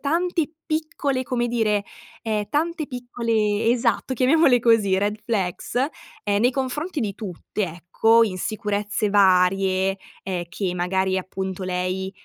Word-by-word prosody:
tante 335 Hz, +1 st, 0 dB
piccole, 310 Hz, -4 st, -1 dB
come 245 Hz, -2 st, -1 dB
dire, 215 Hz, -4 st, +1 dB, 0.4 s
ehm, 215 Hz, -2 st, -1 dB
tante 320 Hz, 0 st, -1 dB
piccole 230 Hz, -4 st, -1 dB
esatto 240 Hz, +2 st, +1 dB
chiamiamole 260 Hz, 0 st, +4 dB
così, 225 Hz, -5 st, +3 dB
red 205 Hz, +2 st, 0 dB
flags, 195 Hz, -3 st, -2 dB, 0.5 s
ehm, 205 Hz, 0 st, +1 dB
nei 245 Hz, -, +4 dB
confronti 280 Hz, +5 st, -3 dB
di 205 Hz, -4 st, -2 dB
tutte, 205 Hz, +1 st, -5 dB
ecco. 190 Hz, +7 st, +3 dB
Insicurezze 205 Hz, +1 st, -2 dB
varie, 190 Hz, 0 st, +3 dB, 0.2 s
ehm, 180 Hz, -2 st, -3 dB
che 180 Hz, +1 st, -2 dB
magari 190 Hz, +1 st, 0 dB
appunto 190 Hz, 0 st, -5 dB
lei, 185 Hz, +1 st, -2 dB
210 Hz, 120 wpm, -23 LUFS, 190-250 Hz, 0.5 s, chiamiamole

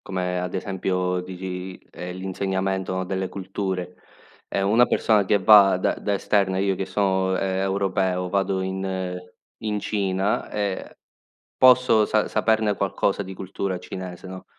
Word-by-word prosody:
come 90 Hz, -1 st, -2 dB
ad 90 Hz, 0 st, -4 dB
esempio 90 Hz, -1 st, -1 dB
dici, 90 Hz, 0 st, -6 dB
ehm, 90 Hz, 0 st, -7 dB
l'insegnamento 95 Hz, 0 st, -2 dB
delle 95 Hz, 0 st, -2 dB
culture. 95 Hz, -2 st, -4 dB, 0.5 s
Ehm, 95 Hz, -, -1 dB
una 120 Hz, +3 st, +5 dB
persona 105 Hz, -3 st, +2 dB
che 100 Hz, +2 st, +3 dB
va 100 Hz, -1 st, +7 dB
da 90 Hz, -, +1 dB
da 100 Hz, -, -1 dB
esterna, 100 Hz, -1 st, +1 dB
io 95 Hz, 0 st, +1 dB
che 95 Hz, +1 st, -4 dB
so', 95 Hz, -1 st, +1 dB
ehm, 95 Hz, -1 st, -1 dB
europeo, 95 Hz, -2 st, 0 dB
vado 95 Hz, -1 st, 0 dB
in 95 Hz, -1 st, -3 dB, 0.4 s
in 105 Hz, -1 st, -2 dB
Cina 100 Hz, -1 st, -1 dB
e 100 Hz, -2 st, -3 dB, 0.6 s
posso 125 Hz, -4 st, +6 dB
sa 110 Hz, 0 st, +1 dB
saperne 110 Hz, -1 st, +1 dB
qualcosa 100 Hz, +1 st, 0 dB
di 95 Hz, 0 st, -8 dB
cultura 95 Hz, 0 st, -4 dB
cinese, 90 Hz, 0 st, -8 dB
no, 95 Hz, 0 st, -9 dB
95 Hz, 140 wpm, -24 LUFS, 95-100 Hz, 0.6 s, va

